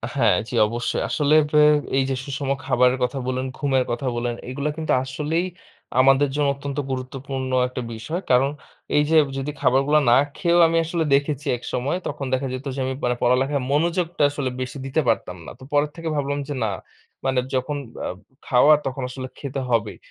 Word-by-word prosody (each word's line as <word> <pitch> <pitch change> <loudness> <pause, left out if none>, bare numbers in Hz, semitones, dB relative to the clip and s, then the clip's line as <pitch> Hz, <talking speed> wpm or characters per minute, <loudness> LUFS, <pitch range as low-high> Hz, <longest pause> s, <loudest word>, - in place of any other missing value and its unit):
হ্যাঁ, 115 -8 +4
জি, - - -9
অবশ্যই। 120 +2 -2
আসলে 150 -1 +1 0.2
আ - - +7 0.4
এই 135 - +3
যে 135 - 0
সুষম 140 0 -4 0.2
খাবারের 125 -1 +3
কথা 125 +3 -1
বললেন, 130 0 -1
ঘুমের 135 -3 +1
কথা 125 +3 -3
বললেন 120 0 -2
এগুলা 140 +3 -2
কিন্তু 160 -1 0
আসলেই 150 +6 -1 0.5
আমাদের 135 +2 +5
জন্য 145 -1 +2
অত্যন্ত 140 0 -6
গুরুত্বপূর্ণ 130 0 -4 0.2
একটা 125 0 -5
বিষয়। 145 +11 -4
কারণ 130 +2 +4 0.5
এই 150 - +5
যে 160 - +5 0.2
যদি 135 +2 -3
খাবারগুলা 135 +4 +4
না 120 - +7 0.2
খেয়েও 175 -2 +3
আমি 165 0 +1
আসলে 165 0 -1
দেখেছি 145 +1 -1
একসময় 125 +6 -2
তখন 140 - -4
দেখা 130 +1 0
যেত 130 +2 -6
যে, - - -4
আমি 130 - -2
মানে 125 0 +1
পড়ালেখার 130 +3 +2
মনোযোগটা 170 +2 +1
আসলে 140 -2 -2
বেশি 130 +2 -5
দিতে 135 +4 +1
পারতাম 95 -5 0
না। - - -8
তো - - -13
পরের 145 0 +2
থেকে 165 -1 -4
ভাবলাম 145 0 -1
যে 145 - -3
না। - - +1 0.6
মানে 135 -1 +2 0.2
যখন 135 +3 -1 0.3
আ - - -1 0.4
খাওয়া 135 +4 +6
তখন 135 0 -3
আসলে 130 0 -6
খেতে 135 -1 -4
হবেই। 115 -3 0
135 Hz, 180 wpm, -23 LUFS, 130-150 Hz, 0.6 s, আ